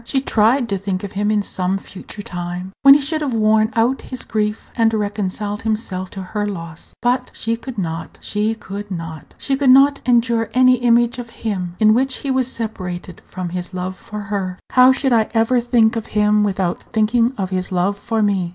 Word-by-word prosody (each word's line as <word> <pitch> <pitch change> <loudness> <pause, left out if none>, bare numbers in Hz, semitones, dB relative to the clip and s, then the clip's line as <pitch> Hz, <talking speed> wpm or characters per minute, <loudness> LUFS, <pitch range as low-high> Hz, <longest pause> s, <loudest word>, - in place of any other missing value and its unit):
She 270 +3 0
tried 240 0 +2
to 195 -1 -1
think 190 -1 -3
of 200 - -5
him 205 +1 -1
in 210 -1 +1
some 185 0 -1
future 195 +1 -10
time, 180 +1 -5
when 275 -1 +9
he - - +4
should 310 +3 -1
have 275 -5 -1
worn 215 0 +3
out 235 +4 +2
his 255 -2 -7
grief, 210 0 -2
and 225 -2 +3
reconciled 205 0 -2
himself 210 -4 -2
to 195 - -7
her 205 +2 -3
loss. 170 -4 -8
But 250 +1 +1
she 230 +1 -1
could 240 +1 -9
not, 165 -3 -4
she 210 +2 -1
could 205 -1 -7
not! 165 -4 -7
She 275 - -1
could 270 -1 +2
not 275 +2 +6
endure 235 -2 +2
any 255 0 +5
image 240 0 +2
of 235 -1 -7 0.2
him 180 -5 -2
in 215 0 +5
which 260 +2 +1
he 275 - 0
was 260 -2 +1
separated 185 -6 -5
from 185 -2 -5
his 180 +1 -5
love 185 +1 -3
for 210 +2 -8
her. 185 -2 -2
"How 255 0 +7
should 265 -1 +1
I 220 -2 +3
ever 230 +2 +3
think 235 -1 +3
of 225 -1 -4
him 210 0 +4
without 190 -3 -1
thinking 230 +3 +2
of 190 -1 -3
his 185 0 -2
love 185 +2 +1
for 220 +2 -1
me?" 195 -4 +1
215 Hz, 205 wpm, -19 LUFS, 190-240 Hz, 0.2 s, when